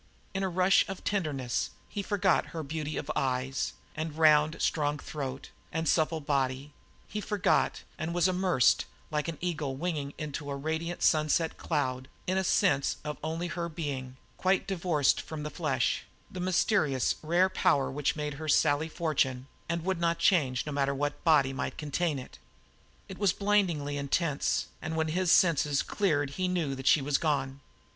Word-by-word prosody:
In 195 - -2
a 190 - 0
rush 185 +2 +4
of 195 - -6
tenderness, 145 -11 -1 0.2
he 205 - -4
forgot 195 -2 +1
her 160 - -3
beauty 155 +1 -4
of - - -3
eyes 130 0 -1 0.2
and 155 -1 -4
round, 155 0 +5
strong 150 -1 +1
throat, 135 -2 -6 0.2
and 160 0 -2
supple 160 0 +2
body 140 -1 -1 0.3
he 210 - -4
forgot, 205 -2 +1 0.2
and 160 +1 -2
was 175 +1 +3
immersed, 180 -8 +3 0.3
like 150 0 -1
an 165 -2 -4
eagle 155 -6 -2
winging 145 -2 -3
into 145 -1 -5
a 140 - -2
radiant 160 +4 -3
sunset 155 +1 +2
cloud, 130 -2 -1 0.2
in 185 - 0
a 190 - +1
sense 160 -7 +2 0.3
only 165 +2 -2
of 175 - -4
her 170 -1 -3
being, 135 -6 -5 0.2
quite 190 +1 +2
divorced 170 -7 +1
from 155 -2 -7
the 150 - -4
flesh, 140 -6 0 0.3
the 185 - -6
mysterious 180 - +2
rare 175 +4 +3
power 140 -7 +2
which 145 +1 0
made 150 -1 -3
her 155 +3 -7
Sally 155 +1 +3
Fortune, 135 -6 0 0.2
and 170 0 -2
would 190 -2 0
not 170 0 +1
change 150 -8 +2
no 150 - -4
matter 140 -1 0
what 145 +1 -2
body 145 -5 +4
might 135 - -4
contain 155 +1 -1
it. 130 - -10 0.7
It 190 - -9
was 200 -3 +3
blindingly 180 -9 +1
intense, 140 +1 0 0.2
and 160 - -4
when 160 0 0
his 180 +2 +1
senses 150 -5 +4
cleared 145 -9 0
he 185 +6 -1
knew 170 -6 -1
that 135 0 -5
she 150 - +5
was 140 0 +1
gone. 140 -3 -1
155 Hz, 170 wpm, -29 LUFS, 140-175 Hz, 0.7 s, round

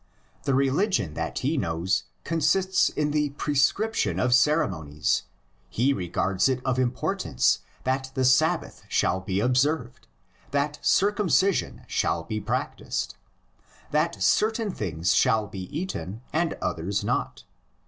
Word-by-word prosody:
The 135 - +2
religion 135 - +1
that 80 +1 -4
he 150 +5 0
knows 85 -3 0 0.2
consists 170 +4 +2
in 150 0 -1
the 150 -1 +1
prescription 170 +10 +1
of 125 -1 +2
ceremonies; 95 - +1 0.4
he 130 +5 +2
regards 95 +2 0
it 130 -1 0
of 130 -1 +1
importance 125 0 +1 0.2
that 130 +1 -1
the 130 -1 +1
Sabbath 130 0 +2
shall 95 - +1
be 95 0 -2
observed, 125 +2 0 0.4
that 145 +1 -1
circumcision 200 -2 +2
shall - - 0
be - - -3
practised, - - -3 0.8
that - - 0
certain 220 -1 +2
things 90 - -1
shall 110 -4 +3
be 95 -2 -7
eaten 115 - -5
and 165 +1 0
others 90 +3 -2
not. - - -2
130 Hz, 120 wpm, -26 LUFS, 95-155 Hz, 0.8 s, shall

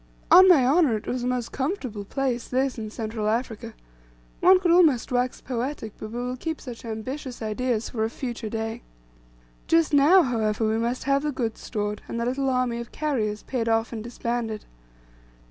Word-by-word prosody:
On 375 +1 +9
my 290 -8 +6
honour, 275 -4 +4
it 210 - -10
was 250 - -2
a - - -1
most 250 -2 -2
comfortable 260 - -3
place, 250 0 -2
this, 260 -1 0
in 215 -1 -5
Central 220 -1 -3
Africa. 230 0 -3 0.6
One 370 0 +6
could 360 -2 +2
almost 310 -8 +4
wax 250 0 0
poetic, 245 -3 -4
but 215 - -6
we 235 - -6
will 250 +1 -3
keep 320 +4 -4
such 245 -4 -9
ambitious 245 +4 -5
ideas 225 +1 -1
for 220 -2 -1
a 220 - 0
future 235 -2 -5
day. 225 0 -4 0.9
Just 330 -2 +3
now, 310 +6 +6
however, 220 -4 0
we 220 +1 +1
must 235 +2 -1
have 275 0 +2
the 300 0 -1
goods 230 -5 -3
stored, 210 -2 -3
and 235 - -4
the 235 - -1
little 265 +2 0
army 250 -2 0
of 235 - -8
carriers 225 -9 -2
paid 235 -3 -2
off 225 +1 +1
and 220 -2 -5
disbanded. 235 -2 -3
245 Hz, 185 wpm, -25 LUFS, 225-270 Hz, 0.9 s, On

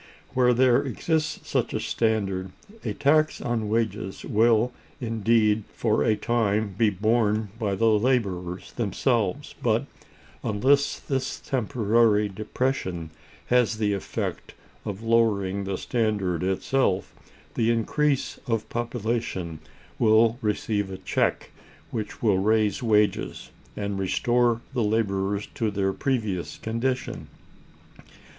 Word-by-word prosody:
Where 125 -1 +4
there 125 0 +4
exists 155 +3 -2
such - - 0
a - - 0
standard, 95 -5 -1 0.3
a - - -3
tax 155 +2 +3
on 115 -3 -2
wages 105 -4 -2
will 115 +2 +3 0.3
indeed 110 -2 +2
for 110 -2 +1
a 110 -2 +3
time 105 -2 0
be 110 +2 +3
borne 110 +1 +1
by 100 -4 0
the 115 - +1
laborers 105 -6 +1
themselves; - - -1
but, - - +1 0.6
unless 135 +7 +2
this 135 -1 -3
temporary 110 -3 +2
depression 95 - -2 0.4
has 120 -2 +3
the 105 -2 +1
effect 100 - -4 0.3
of 100 +2 -5
lowering 100 -4 +2
the 95 -1 -2
standard 105 -8 -1
itself, 95 +2 0 0.4
the 115 -1 +1
increase 135 +5 0
of 110 -2 -1
population 115 -8 -3 0.4
will 115 +1 +4
receive 105 -2 -1
a 95 - -6
check, - - -1 0.4
which 110 +1 -5
will 100 -4 +3
raise 110 +3 +2
wages, 105 -3 +1 0.3
and 100 -1 -2
restore 120 +4 +2
the 125 - 0
laborers 100 -2 0
to 110 - 0
their 95 -1 0
previous 110 -10 -2
condition. 125 +3 -2
110 Hz, 115 wpm, -25 LUFS, 100-120 Hz, 0.6 s, Where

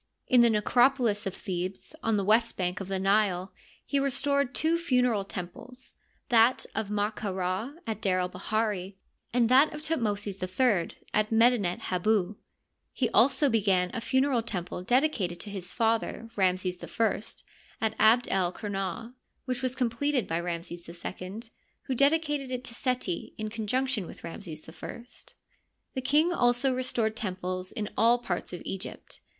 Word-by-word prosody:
In 250 -1 +5
the 235 - +6
necropolis 230 -1 +3
of 195 - -4
Thebes, 185 +2 -4
on 225 -1 +1
the 200 - 0
west 225 +3 +3
bank 180 -1 -1
of 195 - -5
the 195 0 -1
Nile, 195 -1 +1 0.3
he 280 - +1
restored 280 0 +1
two 330 +2 +2
funereal 250 -9 +2
temples, 200 +8 -8 0.4
that 235 +1 +4
of 215 -1 -2
Ma 210 0 0
ka 210 -1 -4
Ra 185 +7 -2
at 220 -2 -4
D^r 185 -2 +2
el 180 - 0
bahiri, 200 -1 -2 0.4
and 240 -1 +3
that 265 +5 +6
of 300 0 -8
Thutmosis 210 -10 -1
III 185 -1 +1 0.2
at 215 0 +2
Medinet 225 -5 +3
Hibu. 200 +1 +1 0.6
He 245 - -1
also 265 +5 +4
began 195 -6 +2
a 230 - -3
funereal 260 +1 +2
temple 180 -6 -4
dedicated 225 - +1
to 205 - -7
his 185 -3 -4
father, 230 0 0
Ramses 185 -2 0
I, 225 -3 0 0.6
at 220 -1 0
Abd 235 +3 +5
el 185 -2 +2
Qumah, 205 +3 -4 0.3
which 255 -1 -2
was 255 -1 -1
completed 255 0 0
by 165 +1 -1
Ramses 170 0 -5
II, 185 +4 -6 0.4
who 265 - -2
dedicated 290 0 +2
it 255 -1 -3
to 235 - -6
Seti, 250 -8 -2
in 215 0 -3
conjunction 230 -1 -1
with - - -12
Ramses 165 -2 -7
I. 170 +7 -8 0.9
The 260 - -2
king 300 +7 +3
also 245 -1 +2
restored 240 -4 0
temples 185 -3 -3
in 210 -1 -3
all 230 +2 +5
parts 195 -7 -3
of 175 - -7
Egypt. 195 -1 -6
220 Hz, 155 wpm, -28 LUFS, 185-250 Hz, 0.9 s, the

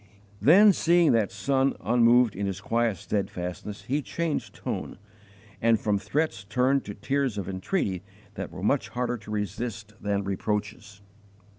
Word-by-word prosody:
Then, 195 - +7
seeing 170 -1 +4
that 115 -4 +2
son 135 0 +1
unmoved 120 +1 +4
in 100 +1 -2
his 95 -1 -3
quiet 115 -1 0
steadfastness, 95 +1 -4
he 145 +4 -1
changed 165 +1 -3
tone, - - -5 0.6
and 115 -1 +4
from 105 -2 0
threats 145 -3 -1
turned 130 +6 +1
to 100 - -6
tears 135 +1 -1
of 95 -3 -3
entreaty 95 - -2 0.3
that - - -5
were - - -9
much - - +1
harder 120 +1 -2
to 105 -1 -14
resist 105 +1 -4
than 100 0 -1
reproaches. 105 +1 -3
110 Hz, 145 wpm, -27 LUFS, 100-130 Hz, 0.6 s, Then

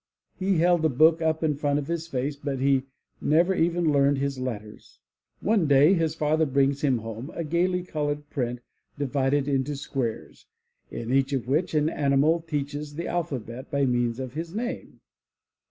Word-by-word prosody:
he 190 -1 +1
held 175 0 +3
a 160 - +4
book 160 +5 +4
up 160 0 0
in 155 -2 +2
front 145 0 0
of 145 - -2
his 165 +1 -3
face 140 -1 -2
but 140 -1 -4
he 135 0 +2 0.4
never 170 +5 +3
even 170 -2 +1
learned 140 0 +3
his 140 -1 -2
letters! 110 -5 -7 0.4
One 205 -7 +2
day 145 +5 +6
his 165 -4 0
father 155 0 +1
brings 140 +1 +1
him 135 -4 +2
home 115 +4 -7
a 170 - -2
gaily 175 +3 0
colored 145 -3 -3
print, 125 -3 -2 0.4
divided 140 0 0
into 140 +1 0
squares, 130 -4 -4 0.4
in 115 +2 -4
each 135 +1 +2
of 130 -3 -2
which 155 +5 0
an 150 0 +3
animal 145 +2 +2
teaches 145 -2 -4
the 170 +2 -4
alpha 165 -6 -2
bet 120 +4 -9
by 140 -2 +1
means 120 -1 0
of 130 -2 -5
his 165 +4 -5
name. 245 +3 -5
145 Hz, 175 wpm, -26 LUFS, 135-160 Hz, 0.4 s, day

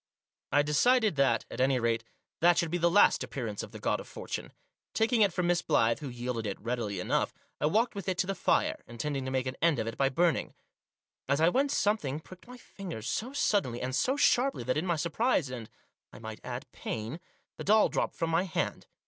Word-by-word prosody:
I 145 +1 +4
decided 215 - +3
that, 125 -5 +2
at - - -3
any 130 0 +3
rate, 115 -1 0 0.4
that 175 +1 +5
should 170 -2 +1
be 175 - 0
the 170 +1 +4
last 205 +4 +5
appearance 115 -6 -4
of - - -8
the - - -8
God - - 0
of - - -9
Fortune. - - -6 0.4
Taking 225 +1 +2
it 200 -2 +5
from 180 +1 -1
Miss 175 0 +2
Blyth, 115 -8 +2
who 145 - -6
yielded 120 -2 -3
it 100 - -4
readily 115 -4 -3
enough, - - 0 0.2
I - - +2
walked 220 +9 +2
with 200 -2 -4
it 185 - -1
to 185 - +1
the 195 - -1
fire, - - +1
intending 135 +3 -3
to - - -2
make 130 -1 -1
an 130 0 -4
end 165 -3 +3
of 110 - -1
it 115 0 -6
by 135 -1 +3
burning. 170 +5 +1 0.7
As 140 +1 +2
I 165 +2 +5
went 275 +8 +1
something 205 - 0
pricked 185 +6 -15
my 250 0 -10
fingers 175 - -8
so 230 - -2
suddenly, 200 - +1
and 130 +1 -2
so 265 - +1
sharply, 270 - +3
that 130 +2 0
in 160 +5 -1
my 170 - +2
surprise 170 - 0
and, 120 -4 -7 0.4
I - - -12
might 110 -1 -8
add, - - -6
pain, 110 +9 -5 0.4
the - - -5
doll 215 +2 +5
dropped - - -2
from 165 -1 -1
my 165 +2 +3
hand. 185 -4 -3
155 Hz, 220 wpm, -30 LUFS, 125-195 Hz, 0.7 s, that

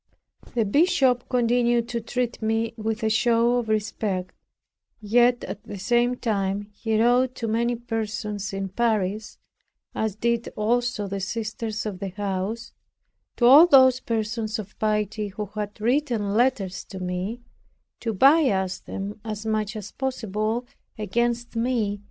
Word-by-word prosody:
The 230 -2 +2
bishop 260 - +2
continued 240 -1 +2
to 235 -1 -2
treat 245 +1 -3
me 225 +1 0
with 220 0 -3
a 220 - +2
show 235 +1 +3
of 235 -3 -2
respect; 205 -3 -2 0.7
yet 240 +3 +3
at - - -6
the 205 - -8
same 240 +5 +2
time 200 -4 -1
he 220 +1 -1
wrote 250 +2 +3
to 230 - -3
many 235 +2 +1
persons 215 -3 -4
in 195 0 -3
Paris, 215 -1 -1 0.6
as 220 -3 -2
did 235 +1 0
also 240 0 0
the 195 0 -3
sisters 220 +2 -4
of 200 -4 -4
the 195 - -4
house, 200 +3 -4 0.6
to 240 - +2
all 285 +8 +9
those 260 -5 +6
persons 220 -1 -2
of 210 -1 -8
piety 210 0 0
who 210 +2 -5
had 210 -1 -5
written 235 -4 0
letters 215 -6 +1
to 190 - -8
me, 185 +6 -4 0.6
to 230 - -2
bias 210 - +3
them 205 +2 -6
as 215 -1 -5
much 215 0 -1
as 210 -1 -7
possible 225 -2 -2 0.3
against 235 +2 -1
me. 230 -4 0
220 Hz, 140 wpm, -25 LUFS, 205-240 Hz, 0.7 s, all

